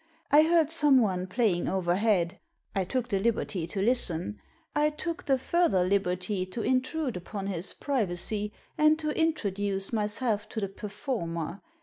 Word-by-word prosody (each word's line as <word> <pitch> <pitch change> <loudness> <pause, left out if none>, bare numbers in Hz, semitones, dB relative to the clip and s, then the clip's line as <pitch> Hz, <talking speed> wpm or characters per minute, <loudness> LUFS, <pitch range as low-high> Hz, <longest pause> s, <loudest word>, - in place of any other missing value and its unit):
I 295 +2 +8
heard 320 -1 +3
someone 245 - +3
playing 190 -4 +1
overhead. 185 0 +1 0.3
I 190 -1 0
took 250 +4 -1
the 195 - +1
liberty 200 -5 -1
to 195 +3 -2
listen. 210 -5 0 0.3
I 300 +1 +4
took 335 +3 -5
the 270 -1 +4
further 295 - +2
liberty 185 0 0
to 220 +4 -4
intrude 260 - 0
upon 195 +3 -5
his 185 -2 -3
privacy, 210 -5 -2 0.3
and 305 0 +5
to 305 -1 -1
introduce 205 - -1
myself 210 0 -1
to 225 - -3
the 200 -2 -2
performer. 195 - -4
210 Hz, 140 wpm, -29 LUFS, 185-265 Hz, 0.3 s, I